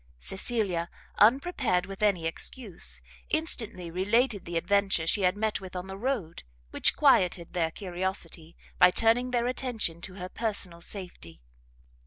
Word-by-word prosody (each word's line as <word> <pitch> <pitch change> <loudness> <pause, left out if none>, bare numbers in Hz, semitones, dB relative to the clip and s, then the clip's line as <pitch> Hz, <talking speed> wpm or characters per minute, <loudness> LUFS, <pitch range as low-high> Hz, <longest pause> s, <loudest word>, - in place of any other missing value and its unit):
Cecilia, 190 - -1 0.3
unprepared 240 - +3
with 195 0 -9
any 195 -6 +2
excuse, 190 +4 -4 0.3
instantly 225 - -1
related 205 +4 +1
the 170 0 -2
adventure 195 -1 +2
she 200 +5 +1
had 185 +1 +2
met 215 -1 0
with 190 -1 -9
on 180 0 -4
the 190 0 -7
road, 210 -7 -2 0.3
which - - +3
quieted 175 -2 +3
their 170 -3 +1
curiosity, 175 -2 -5 0.2
by 180 - +9
turning 230 +6 +3
their 240 -1 +1
attention 240 -9 -2
to 185 +1 -8
her 180 -2 -5
personal 190 -5 -3
safety. 175 - -8
190 Hz, 140 wpm, -28 LUFS, 175-225 Hz, 0.3 s, by